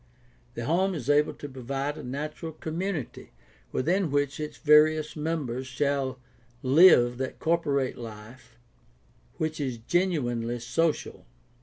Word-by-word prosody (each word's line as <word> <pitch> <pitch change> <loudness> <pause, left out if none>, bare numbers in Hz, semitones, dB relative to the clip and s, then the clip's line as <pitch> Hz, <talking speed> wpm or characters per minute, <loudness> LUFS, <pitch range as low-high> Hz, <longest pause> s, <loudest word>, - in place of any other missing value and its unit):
The 120 - -4
home 185 +6 +1
is 145 -2 -1
able 150 +1 +3
to 145 - -8
provide 135 +2 -4
a - - -8
natural 150 +5 -5
community 160 - -5 0.4
within 175 +6 +1
which 145 0 0
its 150 0 -5
various 155 0 +4
mem 155 -1 -2
bers 125 +2 -4
shall 135 0 -1 0.4
live 130 -4 +6
that 130 -1 -3
corporate 145 -7 0
life 115 +2 -11 0.8
which 155 0 -2
is 130 -4 -2
genuinely 120 -5 0
social. 130 - -1
145 Hz, 125 wpm, -27 LUFS, 125-160 Hz, 0.8 s, live